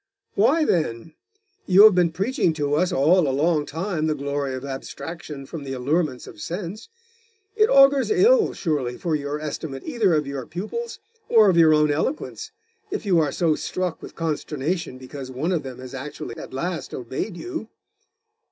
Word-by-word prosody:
'Why, 290 +10 +3
then? 155 - -1 0.5
You 190 +2 +7
have 215 -1 +9
been 175 -2 +3
preaching 195 - 0
to 145 -2 -1
us 180 +4 +2
all 155 +4 +4
a - - +1
long 150 +2 +1
time 160 +1 -2
the 155 - 0
glory 140 -1 -2
of 130 +1 -6
abstraction 140 +1 -7
from 155 +1 -7
the 135 -1 -5
allurements 135 +1 -1
of 105 - -12
sense. 180 - -6 0.7
It 435 0 +4
augurs 275 0 +6
ill, 430 +3 +4
surely, 140 -8 -2
for 170 -3 -2
your 145 0 -2
estimate 150 -2 -5
either 220 - +2
of 150 -1 +1
your 140 -2 -5
pupils 215 - -5 0.3
or 220 -4 +6
of 170 - 0
your 160 -2 +6
own 150 -1 +3
eloquence, 165 - -2 0.4
if 360 - -4
you 180 -4 +4
are 150 -3 +1
so 165 0 +2
struck 180 +2 -3
with - - -10
consternation 160 -1 -2
because 130 +1 -8
one 135 +8 -2
of 170 -4 +1
them 130 -2 -8
has 130 0 -10
actually 135 -3 -6
at - - -9
last 170 +6 -4
obeyed 130 - -4
you. 350 - -6
160 Hz, 175 wpm, -23 LUFS, 140-185 Hz, 0.7 s, have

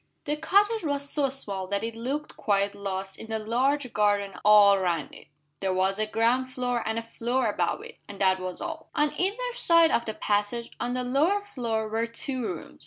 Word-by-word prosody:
The 295 - 0
cottage 405 +7 +2
was 285 -2 -2
so 285 -2 +1
small 200 -8 -1
that 200 +2 -2
it 230 0 -3
looked 275 +6 -4
quite 200 -1 +1
lost 195 -1 -5
in 225 - -8
the 220 - -1
large 250 +5 0
garden 205 -1 +1
all 205 -1 +7
round 170 -5 -1
it. - - -13 0.3
There 190 -1 -1
was 190 +2 +1
a 215 - 0
ground 240 +4 +1
floor 245 -1 -1
and 220 0 -1
a 230 - -2
floor 235 +2 -1
above 180 -5 -1
it - - -12
and 200 - -9
that 190 -1 +3
was 185 +5 -5
all. 320 -1 -6
On 295 0 +2
either 460 +7 -1
side 335 -9 +5
of 235 - +1
the 220 - -4
passage, 210 +3 -1
on 245 +1 -2
the 255 - -1
lower 315 +11 +1
floor, 230 - -2
were 225 +2 -1
two 255 +3 -4
rooms. 180 -7 -6
230 Hz, 205 wpm, -27 LUFS, 200-280 Hz, 0.3 s, all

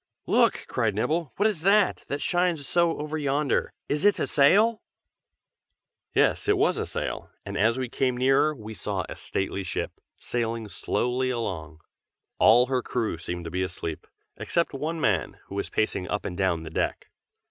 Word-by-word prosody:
"Look!" - - +3
cried 110 -3 0
Nibble. 155 +7 0
"What 205 - +1
is 200 -8 -2
that, 200 +2 +3
that 140 0 -3
shines 175 -5 +1
so 170 -1 +2
over 150 +1 -3
yonder? 140 0 0 0.2
is 145 +1 0
it 205 0 +5
a - - 0
sail?" 210 +11 +4 1.3
Yes, - - +3
it - - +4
was - - +2
a - - -2
sail, - - -4 0.2
and - - -5
as 115 +5 +3
we 130 -1 -2
came 125 +1 0
nearer 135 +4 +3
we 110 -3 -8
saw - - -2
a - - -7
stately 95 0 -3
ship, 90 - -3 0.3
sailing 115 -2 -2
slowly 125 +5 -1
along. 85 -10 -4 0.6
All 120 +3 +7
her 130 0 0
crew 115 -9 -2
seemed 85 0 -5
to 80 - -5
be 90 - -1
asleep, 85 -3 -4 0.3
except 170 -2 0
one 155 +4 -3
man, 100 - 0
who - - -8
was 100 0 -3
pacing 100 -4 -1
up 105 - -2
and 90 - -4
down 90 -4 0
the 80 - -8
deck. - - -2
125 Hz, 175 wpm, -26 LUFS, 100-155 Hz, 1.3 s, All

